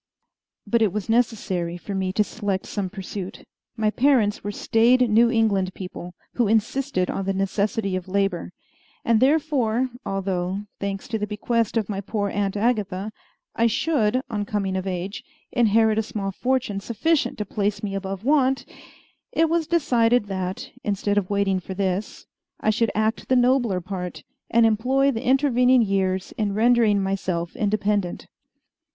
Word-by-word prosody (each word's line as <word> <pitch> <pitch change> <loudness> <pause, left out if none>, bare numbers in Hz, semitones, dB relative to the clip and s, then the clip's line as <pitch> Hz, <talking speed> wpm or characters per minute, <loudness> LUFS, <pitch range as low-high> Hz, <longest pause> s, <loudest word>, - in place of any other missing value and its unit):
But 230 +2 +1
it 215 -4 +3
was 210 +1 -4
necessary 200 -7 0
for 200 +3 -7
me 190 -1 -1
to 210 - +3
select 205 -3 -3
some 200 -3 -3
pursuit. 195 -1 -7 0.3
My 215 -1 +1
parents 240 -5 +2
were 205 - -3
staid 240 +4 +3
New 230 +2 +5
England 200 -5 +1
people, 180 -1 -8 0.2
who 240 -3 +1
insisted 225 -1 0
on 195 - -3
the 195 0 -1
necessity 195 +1 0
of 185 -1 -4
labor, 195 -2 -1 0.5
and 230 -2 +4
therefore, 260 -4 +2
although, 190 -1 -2 0.2
thanks 200 -1 -4
to 225 -2 -1
the 210 - -2
bequest 225 +2 -1
of 220 - 0
my 200 -2 -3
poor 205 0 -2
Aunt 200 0 -1
Agatha, 210 -3 0 0.4
I 230 - +3
should, 255 -1 +1
on 210 -2 -2
coming 200 -2 -2
of 190 0 -2
age, 190 +5 -4 0.3
inherit 220 -2 +3
a - - +3
small 205 -2 -4
fortune 250 -2 -1
sufficient 275 +10 0
to 210 - -3
place 205 +1 -2
me 200 -2 -3
above 195 +1 -4
want, 270 -2 +2 0.7
it 325 0 +2
was 335 -2 +1
decided 245 -8 +2
that, 190 -2 -4
instead 205 0 +1
of 185 - -6
waiting 200 -2 +1
for 185 +1 -7
this, 195 +1 -2 0.3
I 215 - +2
should 230 +1 +1
act 215 +1 -1
the 260 - +4
nobler 245 -6 +3
part, 180 -1 -6 0.3
and 230 0 +4
employ 260 +6 +2
the 230 -1 -4
intervening 255 -2 +4
years 190 -2 0
in 205 -2 0
rendering 220 -3 +4
myself 185 -3 -2
independent. 205 -3 0
210 Hz, 160 wpm, -24 LUFS, 195-235 Hz, 0.7 s, New